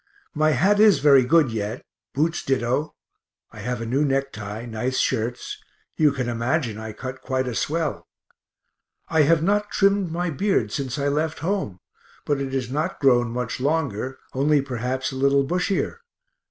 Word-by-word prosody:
My 155 0 +2
hat 195 +10 +3
is 215 -2 +7
very 140 -3 +6
good 145 0 +3
yet, 110 +2 -4 0.3
boots 160 +4 +1
ditto; 130 +3 -1 0.6
have 120 +2 -4
a - - -3
new 130 +6 +1
necktie, 120 -6 -2
nice 120 +3 -2
shirts 120 0 -1 0.4
you 150 -2 +4
can 130 -3 -3
imagine 120 0 -1
I 110 0 -6
cut 130 +4 -7
quite 130 -1 -1
a 125 - -3
swell. 155 +4 -2 1.0
I 160 - +3
have 155 +2 +4
not 205 +3 +1
trimmed 195 -3 +2
my 175 +1 -1
beard 175 - 0
since 135 +1 -3
I 140 0 0
left 155 +2 -1
home, 185 - -1 0.5
but 145 -2 0
it 135 -1 -3
is 130 -2 -2
not 155 +6 -2
grown 120 -3 +4
much 120 0 -3
longer, 135 -4 -1 0.2
only 145 +3 +3
perhaps 130 0 -2
a - - -7
little 140 +1 +3
bushier. 180 - -1
135 Hz, 160 wpm, -23 LUFS, 125-160 Hz, 1.0 s, is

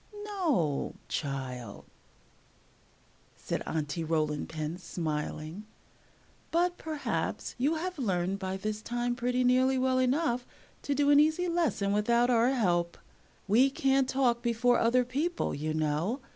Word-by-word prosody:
"No, 310 - 0
child," 130 -6 -4 1.5
said - - -4
Aunty 155 +1 -2
Rolling 155 -2 -1
Pin, 160 +2 -4
smiling; 160 +2 -4 0.8
"but 350 +2 +1
perhaps 310 -2 -3
you 290 +6 +2
have 360 +1 -4
learned 190 -4 0
by 190 -1 -3
this 215 +2 -3
time 240 +1 -2
pretty 250 +1 0
nearly 255 +1 +3
well 260 0 +2
enough 255 -1 +1 0.3
to 285 - -1
do 290 +1 +3
an 285 - +7
easy 315 +4 +3
lesson 330 - 0
without 235 +4 +3
our 235 +1 +4
help. 175 -9 +1 0.5
We 240 +7 +5
can't 270 -1 +1
talk 245 -3 +2
before 240 +1 +2
other 245 +2 +3
people, 305 +8 -1
you 155 +2 -3
know. 155 - 0
240 Hz, 130 wpm, -30 LUFS, 170-270 Hz, 1.5 s, an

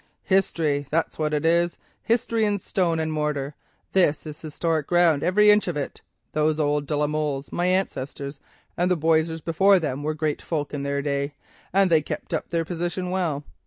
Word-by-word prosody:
"History—that's 160 -6 0
what 155 -1 0
it 150 0 0
is; 170 +1 +2 0.2
history 230 -1 +1
in 205 -1 +2
stone 175 -4 0
and 160 0 -1
mortar; 150 -2 -2 0.4
this 165 -6 +2
is 150 -1 -8
historic 160 -1 -1
ground, 175 -4 +4
every 210 +5 +5
inch 210 -1 +3
of 170 -4 -2
it. 140 - -5 0.3
Those 155 +1 +1
old 145 -1 +1
de 150 - -1
la 150 - +2
Molles, 150 -2 -2
my 175 +1 0
ancestors, 140 -6 -2 0.4
and 175 +1 +1
the 180 - +2
Boisseys 160 +1 +1
before 190 +5 +4
them, 145 -5 -2
were 155 +1 -2
great 155 -1 -1
folk 150 -3 -3
in 145 - -3
their 140 0 -1
day, 140 0 -2 0.4
and 195 -1 +3
they 160 -2 +5
kept - - -6
up - - -2
their 165 -1 0
position 175 +2 -3
well. 165 -6 -1
160 Hz, 185 wpm, -24 LUFS, 145-175 Hz, 0.4 s, every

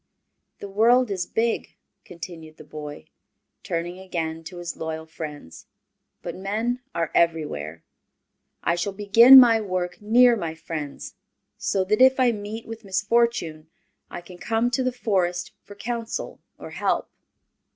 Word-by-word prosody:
"The 200 - -8
world 230 +4 +3
is 185 -3 -2
big," 230 +1 -1 0.3
continued 165 -3 -10
the - - -12
boy, 150 0 -9 0.6
turning 175 -1 -4
again 165 -3 -4
to 180 +2 -9
his 175 -1 -5
loyal 160 0 -5
friends, 150 - -9 0.6
"but - - -5
men 220 +6 -2
are 165 -1 -1
everywhere. 150 - 0 0.8
I - - +2
shall 175 +3 -2
begin 225 +6 +8
my 230 -3 +6
work 185 -3 -3
near 240 +3 +5
my 165 -7 -4
friends, 155 -3 -7 0.5
so 195 - 0
that 210 +5 0
if 260 0 +6
I 250 -2 +4
meet 215 +1 -6
with 225 0 -9
misfortune 195 -5 0 0.4
I 175 - -7
can 180 0 -14
come 230 +4 0
to 260 - 0
the 255 - 0
Forest 185 -7 -1
for 205 - -13
counsel 230 +2 -5 0.2
or - - -10
help." - - -1
190 Hz, 140 wpm, -24 LUFS, 165-225 Hz, 0.8 s, begin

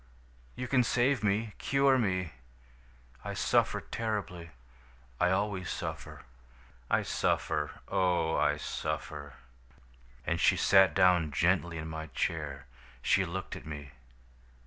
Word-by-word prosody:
You 125 - -4
can 125 0 +3
save 125 +1 +1
me, 105 +1 0
cure 135 -1 +3
me. 95 -7 0 0.9
I - - -5
suffer - - +2
terribly. 100 -7 -4 0.7
I 90 - +3
always 95 -1 -1
suffer. - - -6 0.7
I - - +2
suffer, 75 0 -1
oh, 90 -3 +1
I 75 -1 +2
suffer!' 75 -1 -5 0.9
"And 85 0 0
she - - +4
sat 95 -5 +5
down 90 -4 +4
gently 85 +1 +1
in 80 0 -5
my 80 0 -5
chair. 75 -3 -2 0.4
She 95 - +3
looked 95 +2 -5
at - - -10
me. 75 -3 -7
90 Hz, 120 wpm, -30 LUFS, 80-105 Hz, 0.9 s, sat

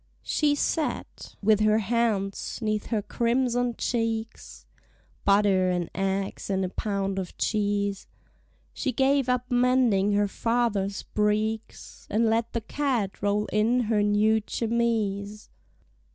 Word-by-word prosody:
She 295 -1 +1
sat, 305 +1 -3
with 215 0 +4
her 215 0 +4
hands 220 -2 -1
'neath 215 -2 -2
her 215 -3 -1
crimson 245 +1 0
cheeks; 225 -1 -3 0.6
(Butter 200 -2 +4
and 175 -2 -2
eggs 195 +1 -2
and 190 -1 0
a - - -3
pound 195 -1 -2
of 185 -2 -7
cheese) 205 -2 -1 0.7
She 265 - -2
gave 270 0 +2
up 250 0 -1
mending 245 -5 +3
her 205 0 +2
father's 205 -3 -1
breeks, 215 +1 -2
And 225 +3 +2
let 230 +1 0
the 230 - -1
cat 240 -5 -2
roll 205 +1 +1
in 225 +4 +3
her 220 -2 +1
new 210 +2 +3
chemise. 215 -3 -1
215 Hz, 125 wpm, -26 LUFS, 200-235 Hz, 0.7 s, with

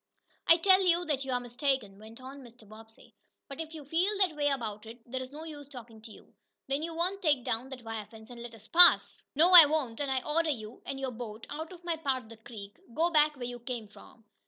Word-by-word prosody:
"I 330 - +7
tell 375 +2 +5
you 350 -1 +2
that 285 -4 -1
you 265 - -4
are 250 - +1
mistaken," 245 -4 -2
went 220 +2 -13
on 265 +2 -10
Mr. 240 -3 -16
Bobbsey. 220 +1 -16 0.3
"But 275 +2 -7
if 320 0 -8
you 300 -3 -9
feel 330 +7 +1
that 375 -5 +2
way 290 -1 0
about 225 -6 -3
it, 230 +1 -10
there 260 +2 -5
is 255 - -7
no 305 +2 -9
use 295 -3 -9
talking 235 -5 -12
to 225 - -12
you. - - -17 0.3
Then 275 +2 -1
you 330 +1 -5
won't 365 +4 -2
take 295 -8 +2
down 250 +1 -3
that 260 -3 -9
wire 225 -2 -6
fence 220 +1 -14
and 240 -1 -10
let 235 -1 -9
us 220 0 -16
pass?" 350 +4 +5
"No, 335 +5 +5
I 340 -4 +11
won't, 285 -7 -2
and 285 -1 -2
I 260 -1 0
order 320 +2 0
you, 220 -5 -5
and 270 - -4
your 265 -1 -3
boat, 225 -2 -8
out 315 +3 -6
of 350 -1 -13
my 340 -2 -2
part 270 -5 -2
of 220 - -18
the 230 - -12
creek. 210 -3 -11 0.2
Go 335 +3 +1
back 300 -1 +4
where 250 -3 -6
you 245 0 -6
come 235 -3 -6
from. 225 +2 -18
265 Hz, 255 wpm, -30 LUFS, 230-315 Hz, 0.3 s, I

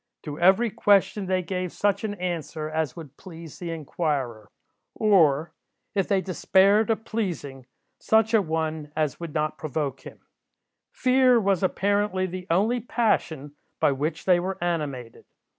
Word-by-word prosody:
To 150 -1 -7
every 190 +6 +4
question 205 -2 +2
they 185 0 0
gave 180 0 -3
such 205 +2 0
an 210 -2 -3
answer 170 -4 -4
as 155 -3 -2
would 150 -5 -11
please 165 -4 -11
the 175 - -5
inquirer; 145 -8 -3 0.5
or, 165 -8 +3 0.4
if 195 -2 0
they 195 -2 +2
despaired 195 +3 +3
of 225 0 -1
pleasing, 160 - -4 0.3
such 220 +1 +2
a 220 - +5
one 160 -3 -3
as 155 -3 -1
would 170 -3 -7
not 155 0 -1
provoke 145 -3 -3
him. - - -12 0.7
Fear 255 -1 +4
was, 195 -3 +1
apparently, 200 0 0
the 185 0 -7
only 210 +9 +2
passion 170 - -1 0.2
by - - +3
which 150 +4 -3
they 180 -2 +4
were 190 +2 -3
animated. 145 -9 -4
175 Hz, 145 wpm, -25 LUFS, 155-200 Hz, 0.7 s, a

